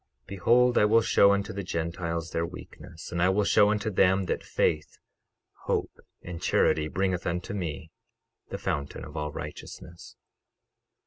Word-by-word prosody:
12:28 - - -44
Behold, 120 +6 +3
I - - +5
will 115 +2 +4
show 100 -2 +5
unto 100 0 -1
the 100 - -4
Gentiles 85 -1 -3
their 85 - -1
weakness 85 -1 -10
and 85 0 -2
I 90 - +4
will 100 +2 +2
show 105 +1 +4
unto 105 +1 -1
them 95 0 +3
that 90 - -2
faith, 75 -1 -1 0.7
hope - - -1 0.3
and 85 -1 -7
charity 75 -1 +2
bringeth 95 +2 -1
unto 85 +3 -3
me—the 80 -5 -8
fountain 70 0 -4
of - - -12
all 75 -1 -3
righteousness. 85 +3 -9
90 Hz, 150 wpm, -27 LUFS, 85-100 Hz, 0.7 s, I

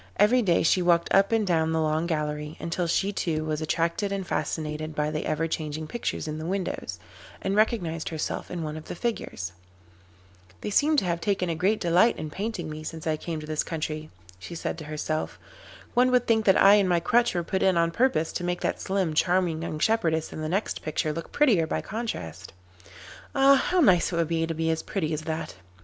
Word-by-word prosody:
Every 245 +4 +5
day 175 -6 +2
she 180 +3 +3
walked 170 -1 +2
up 195 +2 +4
and 225 -2 +2
down 160 -3 +1
the 160 - +1
long 155 +1 0
gallery, 150 -2 -3
until 170 +1 -2
she 195 +4 +1
too 155 -5 -1
was 155 0 -2
attracted 170 +5 0
and 195 -1 -2
fascinated 155 0 -3
by 150 0 0
the 155 - -3
ever 165 +2 0
changing 155 -1 -3
pictures 230 -1 -3
in 155 0 -4
the 155 - -5
windows, 185 - -3 0.4
and 195 +1 -1
recognised 180 -7 +1
herself 160 -2 -4
in 175 -2 -4
one 155 0 -4
of 155 - -9
the - - -6
figures. 170 - -3 1.1
'They - - -3
seem 300 +7 +3
to 225 - +2
have 170 -1 -1
taken 185 -3 0
a - - -2
great 195 +6 +1
delight 175 +7 +3
in 155 - -5
painting 200 -2 -4
me 155 0 -7
since 160 0 -7
I 160 -1 +1
came 160 +1 -5
to - - -7
this 155 0 -1
country,' 155 -1 -4 0.3
she 170 - -8
said - - -3
to 155 - -8
herself. 155 +1 -3 0.6
'One 250 +1 +4
would 250 -1 +3
think 220 -2 +2
that 190 - +5
I 200 +2 +8
and 195 -3 +2
my 175 -1 +3
crutch 235 +6 +2
were 175 - 0
put 190 +3 -2
in 190 -2 +3
on 170 0 +2
purpose 230 -7 +1
to - - -3
make 175 0 -2
that - - -1
slim, 190 -4 0
charming 175 0 +1
young 165 -2 -4
shepherdess 160 -5 +1
in 155 - -6
the 155 - -3
next 195 +5 -1
picture 155 0 -1
look 165 +1 -6
prettier 220 - +3
by - - -1
contrast. 95 - -5 0.8
Ah! 275 0 +6
how 360 +6 +2
nice 185 - +4
it - - -2
would 170 -1 +1
be 165 -1 0
to 165 - -3
be 165 +1 0
as 160 - -1
pretty 160 -6 -2
as 155 - -2
that. 160 - -4
170 Hz, 220 wpm, -26 LUFS, 155-195 Hz, 1.1 s, I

